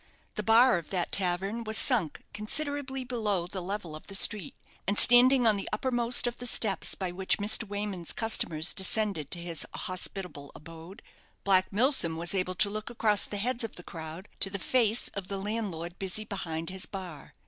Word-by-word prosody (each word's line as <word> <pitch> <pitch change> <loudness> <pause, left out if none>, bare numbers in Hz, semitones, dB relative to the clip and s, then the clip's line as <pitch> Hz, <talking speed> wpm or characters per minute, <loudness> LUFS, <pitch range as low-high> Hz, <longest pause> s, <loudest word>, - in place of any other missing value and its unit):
The - - -2
bar 225 0 +5
of 165 - -13
that 180 -3 -2
tavern 195 +4 0
was 220 0 +1
sunk 215 - +2
considerably 270 +5 -3
below 215 -8 -2
the 185 +1 -5
level 180 -3 -5
of 155 - -12
the 195 - -1
street, 195 -4 +2 0.3
and 200 +1 0
standing 245 +1 +7
on 215 -2 +4
the 195 - -5
uppermost 245 -1 0
of 240 0 -1
the 245 - -3
steps 210 -4 +2
by 185 -2 -4
which 185 +1 0
Mr. 215 +2 +1
Wayman's 200 -4 -4
customers 170 -7 0
descended 195 -6 0
to - - +1
his 170 -2 -2
hospitable 185 -6 -4
abode, 165 +6 -12 0.4
Black 190 -1 +2
Milsom 215 - +3
was 170 +2 -1
able 185 -1 -1
to 200 - +3
look 215 +1 -5
across 215 -3 +2
the 205 - -4
heads 240 +4 -1
of 225 - -6
the 175 - -11
crowd 165 +4 -9
to 195 - +3
the 200 - -3
face 230 +2 +1
of 195 -2 -6
the 195 - -4
landlord 195 -5 -5
busy 195 +3 -3
behind 165 -5 -5
his 190 0 -3
bar. 180 -7 -9
200 Hz, 185 wpm, -28 LUFS, 180-225 Hz, 0.4 s, standing